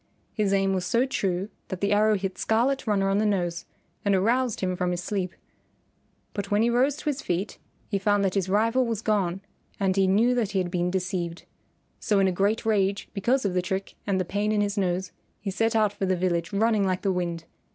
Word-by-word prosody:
His 210 -2 0
aim 195 -1 +2
was 185 -1 -1
so 235 +7 +2
true 195 -6 -1 0.2
that 185 - -5
the 200 +1 0
arrow 215 +1 +4
hit 195 -1 -3
Scarlet 240 +4 +1
Runner 195 -2 +2
on 195 +1 +2
the - - +2
nose 175 -4 -1 0.4
and 200 -1 +3
aroused 235 +5 +1
him 185 -1 0
from 180 0 -1
his 175 0 -2
sleep. 185 -2 -2 1.0
But 200 -1 -4
when 210 +2 +3
he 235 - +2
rose 260 +4 +3
to - - -10
his 295 -1 -1
feet 180 +4 -3 0.3
he 200 - -1
found 205 0 +2
that 190 - 0
his 190 -2 0
rival 230 +5 +2
was 225 -2 -3
gone 195 -4 0 0.4
and 190 -2 +1
he 195 -1 +3
knew 220 +6 +4
that 225 -5 -1
he - - 0
had 180 -2 0
been 175 -1 0
deceived. 180 -2 -3 0.5
So 210 - +1
in 195 -1 +4
a - - +2
great 200 +5 0
rage 200 -2 +1
because 240 +5 +1
of 195 - 0
the 180 - +2
trick 190 +2 -3
and 195 -2 +1
the 185 - 0
pain 205 +4 -1
in 210 -1 +2
his 205 0 -1
nose, 185 -2 -1 0.3
he 200 - -4
set 225 +4 0
out 215 -2 +3
for 195 - -2
the 185 - +2
village 170 -2 0
running 215 0 +2
like 185 -1 -1
the 195 - +2
wind. 170 -2 -2
195 Hz, 225 wpm, -26 LUFS, 185-215 Hz, 1.0 s, arrow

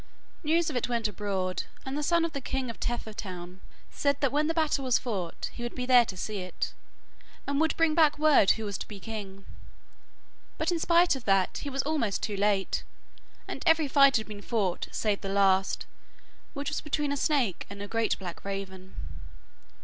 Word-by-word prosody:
News 320 +1 +2
of - - -7
it 245 0 0
went 235 -2 +1
abroad, 195 -2 -2 0.2
and 265 +1 -4
the 295 - -1
son 335 +2 +3
of 335 - -4
the 280 - -3
king 265 -2 -2
of - - -15
Tethertown 190 -6 -5 0.3
said 280 -1 +1
that 275 -3 +2
when 300 +2 +2
the 325 - +1
battle 310 -4 +1
was 255 -2 +3
fought 190 -9 -4
he - - -9
would 240 0 -4
be 250 - -2
there 250 -2 +7
to 190 - -7
see 210 +2 -3
it, 185 -2 -4 0.7
and 280 +1 0
would 320 - +1
bring 330 -1 +3
back 305 -2 +4
word 300 -9 +5
who 220 - -4
was 200 -2 -4
to - - -6
be 205 -2 -9
king. 195 -3 -7 1.1
But - - 0
in 340 - 0
spite 340 -1 +4
of 260 - -8
that, 195 -2 +2
he 285 - -4
was 270 -1 -1
almost 285 -9 -1
too 210 - -1
late, 200 -1 +1 0.7
and - - -5
every 320 -2 +5
fight 275 -1 +6
had 220 - -2
been 210 -2 -8
fought 205 -6 -1
save 210 -2 0
the 195 - -4
last, 195 -1 +2 0.7
which 280 0 -2
was 300 - -2
between 295 -1 -1
a - - 0
snake 270 - 0
and 200 0 -8
a 205 - -5
great 225 +1 0
black 180 -3 -7
raven. 190 -1 -6
235 Hz, 200 wpm, -29 LUFS, 195-285 Hz, 1.1 s, there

